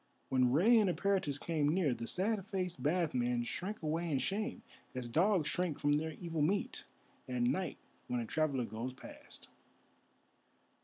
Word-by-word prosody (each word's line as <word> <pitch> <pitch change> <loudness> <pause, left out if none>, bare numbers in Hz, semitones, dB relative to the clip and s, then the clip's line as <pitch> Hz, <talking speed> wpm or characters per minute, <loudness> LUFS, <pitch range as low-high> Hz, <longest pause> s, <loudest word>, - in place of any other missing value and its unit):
When 125 -1 +3
Rei 215 - +6
and 205 -3 +3
Eperitus 185 -6 0
came 155 -4 +1
near, 160 -5 +2
the 115 -1 -5
sad 200 +2 0
faced 185 -3 -3
bath 165 +2 +1
men 120 -1 +1
shrank 185 - -5
away 165 +2 -1
in 145 - +1
shame, 210 - -2 0.3
as 125 -1 -3
dogs 170 - +3
shrink 175 -2 -1
from 145 0 +2
their 160 +2 0
evil 165 -3 -3
meat 195 +7 0 0.4
at 125 -1 0
night 180 +10 0 0.3
when 125 - -1
a 115 - -2
traveller 140 -2 0
goes 115 +4 -5
past. - - -13
160 Hz, 160 wpm, -34 LUFS, 130-185 Hz, 0.4 s, Rei